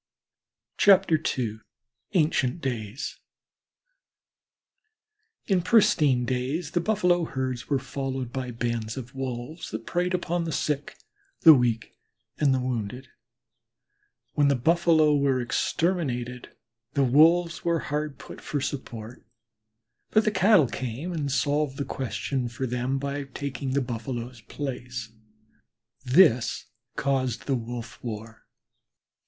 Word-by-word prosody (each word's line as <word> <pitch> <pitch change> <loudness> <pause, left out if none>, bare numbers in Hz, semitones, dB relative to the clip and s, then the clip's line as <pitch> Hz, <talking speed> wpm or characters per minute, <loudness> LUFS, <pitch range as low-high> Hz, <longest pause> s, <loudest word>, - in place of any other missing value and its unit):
II 155 - +3 0.6
ANCIENT 155 -3 +2
DAYS 120 -3 -4 2.3
In 190 -3 +2
pristine 155 - +4
days 130 +6 -2
the 175 - +1
Buffalo 180 -4 +2
herds 130 -4 -4
were 140 - +3
followed 130 -2 -4
by 130 -1 -3
bands 115 -1 -3
of 130 +1 -7
Wolves 130 +4 -5
that 110 +1 -6
preyed 180 +1 0
on 175 0 -1
the 165 - -3
sick, 145 0 -2 0.4
the 160 - +10
weak, 120 -4 0 0.4
and 145 -3 +4
the 130 - +2
wounded. 125 0 -4 1.2
When 145 -1 +3
the 140 - +3
Buffalo 160 +2 +4
were 140 -2 +2
exterminated 125 -2 -1 0.4
the 140 - +2
Wolves 165 +6 +4
were 170 -1 +2
hard 150 -1 -3
put - - -11
for 145 - -2
support, 120 -4 -6 0.9
but 215 0 +3
the 215 - +3
Cattle 190 - +5
came 125 +7 -4
and 145 -4 -2
solved 145 +2 0
the 140 - -2
question 130 +1 -3
for 115 +3 -4
them 125 +2 -1
by 140 +1 -3
taking 135 0 -4
the 140 - +2
Buffaloes' 120 0 -5
place. 125 -3 -6 0.9
This 130 -3 +4 0.3
caused 130 -4 -1
the 140 - 0
wolf 120 0 -6
war. 110 -1 -7
135 Hz, 115 wpm, -26 LUFS, 120-155 Hz, 2.3 s, the